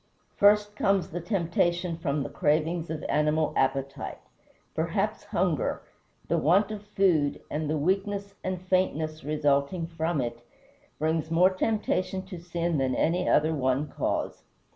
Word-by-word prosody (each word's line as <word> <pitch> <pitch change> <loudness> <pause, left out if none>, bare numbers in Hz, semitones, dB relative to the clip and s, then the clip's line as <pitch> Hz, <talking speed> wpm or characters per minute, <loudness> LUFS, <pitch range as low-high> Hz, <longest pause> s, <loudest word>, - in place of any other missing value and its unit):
First 210 0 +4
comes 195 -2 +1
the 175 +2 -4
temptation 175 -2 0
from 145 -3 -1
the - - -5
cravings 160 +2 0
of 160 -1 -4
animal 150 +1 +1
appetite. 135 +1 -1 0.6
Perhaps - - -1
hunger - - 0 0.4
the - - +1
want 190 +9 +3
of 210 -2 -5
food 170 -9 +2
and 150 0 -2
the 155 - +1
weakness 200 +5 -1
and 185 -1 -2
faintness 160 -4 0
resulting 145 +3 +1
from 165 -1 -2
it 120 -1 -3 0.5
brings 160 +1 0
more 175 +3 +5
temptation 190 -2 -1
to 185 -2 -8
sin 170 -2 -1
than 130 -1 +1
any 175 +3 +1
other 155 +2 +3
one 135 0 0
cause. - - -2
165 Hz, 140 wpm, -27 LUFS, 150-185 Hz, 0.6 s, more